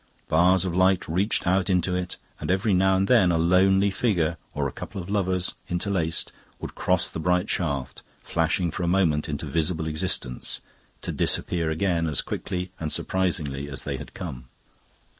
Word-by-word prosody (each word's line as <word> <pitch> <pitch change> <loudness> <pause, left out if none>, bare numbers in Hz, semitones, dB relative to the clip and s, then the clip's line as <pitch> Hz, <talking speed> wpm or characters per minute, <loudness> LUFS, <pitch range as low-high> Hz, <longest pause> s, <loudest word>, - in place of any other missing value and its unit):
Bars 90 +3 +4
of 90 - -2
light 95 0 +3
reached 95 +7 +1
out 95 +2 +2
into 90 -1 +1
it, 90 0 -3 0.2
and - - -5
every 95 +3 +2
now 95 +1 +4
and 95 +1 +1
then 110 -8 +5
a 85 - +2
lonely 95 +4 +4
figure 85 -6 0 0.2
or 70 -1 0
a - - -5
couple 95 - -7
of 90 +2 -6
lovers, 95 -3 +1 0.2
interlaced, 90 -3 0 0.3
would - - -6
cross 90 -2 +2
the - - -5
bright 90 +4 +1
shaft, 70 -7 -2 0.2
flashing 85 +1 0
for - - -5
a 85 - 0
moment 85 -5 +2
into 75 -1 -3
visible 80 0 0
existence, 75 -5 -2 0.4
to - - -3
disappear 85 -2 0
again 85 0 0
as 75 - +1
quickly 90 -1 -4
and 80 -2 -3
surprisingly 80 -7 -1
as 70 - -4
they - - -3
had - - -10
come. 70 -9 -6
90 Hz, 175 wpm, -25 LUFS, 80-95 Hz, 0.4 s, then